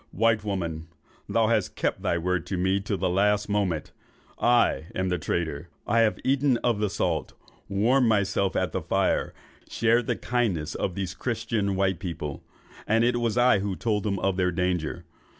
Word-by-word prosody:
'White 115 -2 +2
woman, 85 -6 -3 0.4
thou 115 -1 +3
hast 110 -3 0
kept - - -1
thy 85 - 0
word 90 0 -1
with 95 - -2
me 95 +2 +2
to 100 0 -3
the - - 0
last 105 +3 +2
moment. 100 -6 -1 0.5
I 120 -9 +3
am 95 0 0
the 90 -1 0
traitor. 85 -1 -3 0.2
I 115 +2 +2
have 110 -2 +3
eaten 135 -1 +2
of 120 -4 +1
the 105 -1 +1
salt, - - -1 0.4
warmed 120 +6 +3
myself 100 -2 +1
at 95 -3 0
the - - -2
fire, - - 0 0.4
shared 115 +1 +2
the - - +1
kindness 100 -11 -1
of 90 - -3
these 95 -2 -3
christian 110 -3 -2
white 95 -2 +1
people, 80 -6 -5 0.4
and 115 +2 +3
it 120 0 +2
was 115 -1 -1
I 120 -4 +5
that 95 -1 -3
told 105 -3 0
them 100 -1 -1
of 95 0 0
their 90 -1 +2
danger. 90 -1 -2
100 Hz, 180 wpm, -26 LUFS, 90-115 Hz, 0.5 s, I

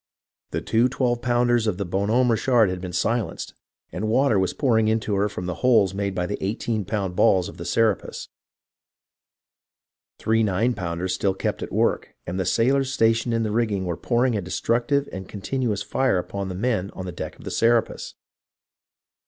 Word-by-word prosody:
The - - -3
two 115 +3 +2
twelve 120 -2 0
pounders 120 -1 +2
of 100 -4 0
the 100 - -2
Bon 95 +4 -1
Homme 125 +2 +3
Richard 115 -3 +3
had 90 -1 -5
been 90 -1 -5
silenced, 105 +2 -1 0.4
and 105 +4 -3
water 120 -1 +3
was 95 - +1
pouring 110 -6 +2
into 110 -1 0
her 100 +1 +1
from 90 -2 -6
the 90 - -2
holes 110 -7 +4
made 100 -1 -2
by 90 - -1
the 105 - -4
eighteen 105 +1 -2
pound 95 -3 -2
balls 90 -1 +3
of - - -10
the 85 - -7
Serapis. 105 -1 0 1.9
Three 110 0 +1
nine 110 +4 +1
pounders 90 -1 -3
still 95 +1 0
kept - - -2
at - - -5
work, - - 0
and 90 +2 -4
the 95 - 0
sailors 130 +7 +2
stationed 115 -1 +2
in 115 - +1
the 110 - -1
rigging 105 -4 0
were 85 -2 -2
pouring 120 +5 +1
a 105 - -1
destructive 120 +9 0
and 95 -1 -7
continuous 105 0 -2
fire 130 -7 +1
upon 100 +2 -4
the 90 - -5
men 105 -2 -1
on 95 - -6
the 90 - -4
deck - - -7
of - - -14
the - - -4
Serapis. 115 0 +1
110 Hz, 185 wpm, -24 LUFS, 95-120 Hz, 1.9 s, holes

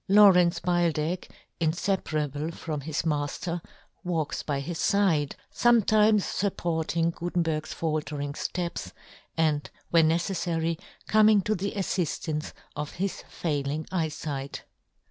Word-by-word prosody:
Lawrence 190 -4 +7
Beildech, 175 -1 0 0.3
infe 175 +4 +1
parable 150 0 -2
from 155 -3 -4
his 155 +2 -2
mafter, 160 +3 -1 0.4
walks 165 -5 -1
by 140 -2 -2
his 160 +4 -4
fide, 170 -8 +2 0.2
fometimes 215 -3 +4
fupporting 170 -3 0
Gu 175 +1 -4
tenberg's 160 -3 -1
faltering 150 -3 -2
fteps, 170 +3 -3 0.4
and 155 -2 +1 0.2
when 165 -2 +5
neceffary 165 -1 0 0.3
coming 215 -1 +6
to 215 - +1
the 200 0 -2
affiftance 170 -5 -2 0.2
of 150 0 -4
his 190 +1 -3
failing 150 -1 -2
eyefight. 150 -5 -3
165 Hz, 110 wpm, -27 LUFS, 155-180 Hz, 0.4 s, Lawrence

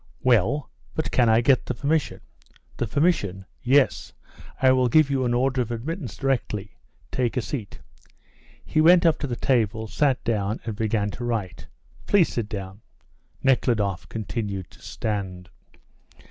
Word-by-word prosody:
"Well; 125 +3 +2 0.2
but - - -2
can 120 -3 +3
I 110 +1 +5
get 130 +1 +3
the 125 - -2
permission?" 145 +1 -1 0.6
"The 120 - -1
permission? 105 - 0 0.2
Yes, 135 +2 +2 0.5
I 130 -1 +5
will 130 -1 +3
give 155 +2 +4
you 130 -2 +1
an 120 0 +1
order 130 +1 +1
of 120 - -3
admittance 130 - -5
directly. 110 -8 -2 0.4
Take 125 -1 -1
a - - +2
seat." 110 -2 -5 0.9
He 155 - +1
went 170 +2 +6
up 165 - +3
to 145 - -2
the 120 - -3
table, 115 -4 0
sat 130 +3 0
down, 105 -2 -1
and 110 -3 -3
began 105 -1 0
to 120 - -7
write. 115 -6 -3 0.4
"Please 195 -5 +4
sit 115 -3 -3
down." 100 -1 -7 0.6
Nekhludoff 110 -8 +1
continued 105 -3 -4
to - - -18
stand. 95 -5 -4
120 Hz, 150 wpm, -24 LUFS, 105-135 Hz, 0.9 s, went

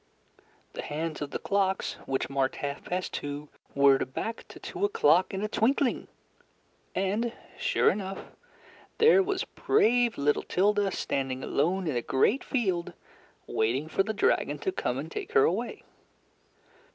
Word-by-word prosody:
The - - -5
hands 155 +1 -4
of 145 - -3
the - - -3
clocks, 195 -1 0
which 135 0 -1
marked 135 -1 0
half 140 0 -5
past 180 +1 -3
two, 145 +1 -5 0.3
whirred 135 -2 +4
back 225 +1 -4
to - - -12
two 375 +1 -6
o'clock 180 - +3
in 195 +1 -3
a - - 0
twinkling. 245 +4 +1 0.9
And, 210 +5 0 0.2
sure - - +2
enough, 195 -1 -6 0.7
there 450 -3 +6
was 385 0 -1
brave 245 - +2
little 145 +1 +2
Tilda 205 +1 +2
standing 135 -5 -2
alone 180 +6 0
in 155 -5 -1
a 120 - +1
great 165 - +2
field 190 -9 -1 0.5
waiting 125 +7 0
for 160 - +1
the 210 +3 -1
dragon 215 - +1
to 380 - +2
come - - -2
and - - -5
take 425 +1 -6
her 440 -2 +6
away. 445 - -1
190 Hz, 150 wpm, -28 LUFS, 145-235 Hz, 0.9 s, there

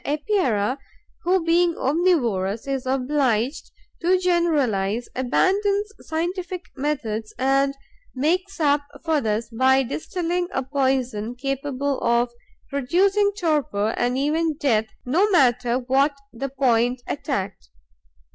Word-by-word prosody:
The 285 - -1
Epeira, 275 - 0 0.4
who, 360 -1 +1
being 340 0 +3
omnivorous, 245 - +1
is 270 -2 -2
obliged 260 -1 0 0.3
to 360 +2 +3
generalize, 280 - +1
abandons 400 +11 +1
scientific 355 +2 -3
methods 230 -7 -3
and 275 +1 +2 0.4
makes 360 +8 0
up 290 -2 +3 0.2
for 315 -3 +2
this 220 +1 -2
by 260 +3 +3
distilling 350 +6 -2
a 265 - 0
poison 255 -4 -1
capable 275 +1 -2
of 235 +1 +2 0.4
producing 380 +10 +2
torpor 275 - 0
and 245 +1 0
even 310 +3 +1
death, 225 -8 +1 0.2
no 350 +12 +2
matter 250 - +3
what 270 +3 +1 0.2
the 270 +4 -4
point 245 -2 +1
attacked. 200 - -4
275 Hz, 110 wpm, -23 LUFS, 245-335 Hz, 0.4 s, being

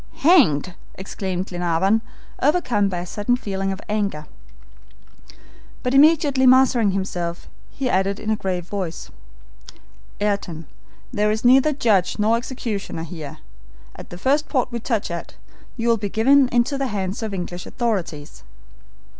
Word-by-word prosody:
"Hanged!" 210 - +4 0.2
exclaimed 190 -1 -4
Glenarvan, 180 +4 +1 0.4
overcome 255 - +2
by 180 - -3
a - - -6
sudden 205 +6 0
feeling 195 -5 -3
of 190 - -5
anger. 200 -8 -2 1.6
But 250 - -1
immediately 285 -2 +5
mastering 250 -4 +5
himself, 180 -3 -3 0.2
he 270 - -3
added 195 -3 0
in 220 0 -2
a - - +2
grave 185 -4 -3
voice: 180 -4 -5 1.1
"Ayrton, 200 -6 -2 0.5
there 210 -2 +1
is 215 +2 -2
neither 265 +4 +6
judge 215 -10 +1
nor 215 +2 +3
executioner 230 -8 -4
here. 155 -3 -8 0.6
At - - -11
the 175 - -8
first 280 +9 +1
port 255 -3 0
we 235 - -3
touch 225 -5 -2
at, 170 - -6 0.4
you 235 0 -2
will 230 - +4
be 205 -1 -3
given 270 +7 +4
up 250 - -6
into 245 +4 +1
the 270 - 0
hands 200 -2 -3
of 220 - -2
the 195 - -5
English 175 0 -6
authorities." 185 - -3
210 Hz, 145 wpm, -22 LUFS, 185-250 Hz, 1.6 s, neither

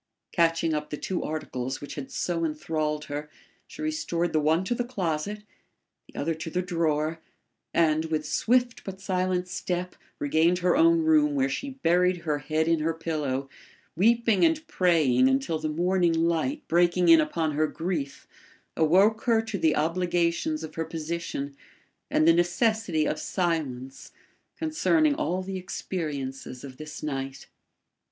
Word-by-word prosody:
Catching 165 -1 +2
up 150 0 -3
the 150 - -4
two 185 +3 -3
articles 130 -4 -4
which 145 - -8
had 140 -3 -6
so 170 -2 -2
enthralled 150 -1 -2
her, 145 +1 -5 0.4
she 310 - -8
restored 175 - -1
the 155 - +3
one 160 +4 +2
to 200 - -1
the 245 - -1
closet, 205 -3 -3 0.6
the - - -9
other 165 - 0
to 160 +1 -6
the 180 +3 -1
drawer, 165 -2 0 0.5
and, 160 -1 +2
with 155 -1 -2
swift 245 +8 +1
but 190 -1 -7
silent 185 -1 -1
step, 180 0 -3 0.2
regained 160 +5 +2
her 180 0 +2
own 330 +2 +5
room 305 -2 +4
where 270 -1 +2
she 280 - -3
buried 180 +2 +3
her 150 -3 -1
head 155 +3 0
in 165 -1 +3
her 160 +1 0
pillow, 150 -5 -2 0.5
weeping 225 +3 +3
and 320 -1 +2
praying 155 - +3
until 135 +4 0
the 155 - -2
morning 175 +2 +2
light, 170 - 0
breaking 175 +1 +3
in 165 -1 +8
upon 155 +1 -1
her 155 +1 +1
grief, 160 -3 -4 0.5
awoke 190 +8 +3
her 230 -2 +4
to 220 -3 -3
the 160 -2 +3
obligations 170 -1 0
of 155 -1 -7
her 165 - -3
position 160 -4 -4 0.5
and 155 - +3
the 165 - +8
necessity 175 -1 +1
of 155 - -1
silence 135 -8 -3 0.5
concerning 310 -1 +2
all 190 - -1
the 190 0 -4
experiences 145 -8 -5
of 130 -2 -9
this 155 +1 -8
night. 135 -2 -4
165 Hz, 155 wpm, -27 LUFS, 155-185 Hz, 0.6 s, in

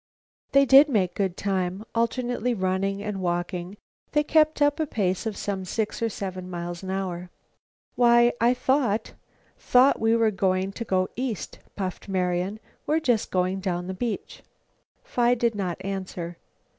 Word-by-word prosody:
They 275 0 +6
did 275 +3 +8
make 195 -8 +1
good 190 -3 -1
time. 190 +1 -2
Alternately 240 +1 0
running 195 +1 -1
and 210 -2 -4
walking, 175 +2 -3 0.4
they 295 -1 +3
kept 310 0 +3
up 290 +1 +3
a 315 - 0
pace 190 -3 -1
of 215 - -4
some 195 -2 -3
six 210 +5 -3
or 230 - +1
seven 185 -3 -6
miles 175 -1 -5
an 190 - -7
hour. 180 -2 -3 0.6
"Why, 240 0 +5
I 240 +2 +4
thought 250 -4 0 0.5
thought 255 +3 +4
we 225 +1 +3
were 225 -1 +3
going 190 -1 0
to 230 - -6
go 185 -2 +1
east," 245 -5 -4 0.2
puffed 190 0 -5
Marian. 185 +2 -1 0.3
"We're 310 +2 +2
just 245 -9 +1
going 185 +1 0
down 180 -2 -2
the 190 - -4
beach." 225 +3 -4 0.6
Phi 245 0 +2
did 235 -1 +1
not 190 -5 -3
answer. 185 -3 -5
200 Hz, 155 wpm, -25 LUFS, 185-240 Hz, 0.6 s, did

